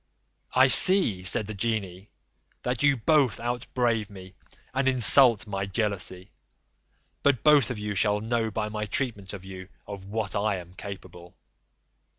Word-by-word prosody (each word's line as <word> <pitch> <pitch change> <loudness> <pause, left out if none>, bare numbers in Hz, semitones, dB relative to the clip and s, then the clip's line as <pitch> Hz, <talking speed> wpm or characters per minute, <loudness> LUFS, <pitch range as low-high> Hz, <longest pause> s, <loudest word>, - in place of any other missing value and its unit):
"I 130 +1 +4
see," 135 - +7
said 95 +3 0
the 110 - -9
genie, 100 -3 -6 0.5
"that 125 -1 -4
you 140 -2 +1
both 135 -1 0
out 120 0 -6
brave 115 -4 -2
me, 95 -2 -14 0.4
and 135 0 -2
insult 125 -3 +5
my 95 -2 -6
jealousy; 100 -2 -5 0.9
but 140 -5 -1
both 150 -3 +3
of 125 - -6
you 105 0 -6
shall 105 +1 -1
know 115 +1 -4
by 105 0 -5
my 105 0 -6
treatment 105 -5 -4
of 95 -2 -11
you 95 0 -12 0.2
of 100 -2 -11
what 105 +1 -6
I 105 0 -2
am 90 -1 -12
capable." 90 -2 -13
105 Hz, 155 wpm, -24 LUFS, 95-120 Hz, 0.9 s, see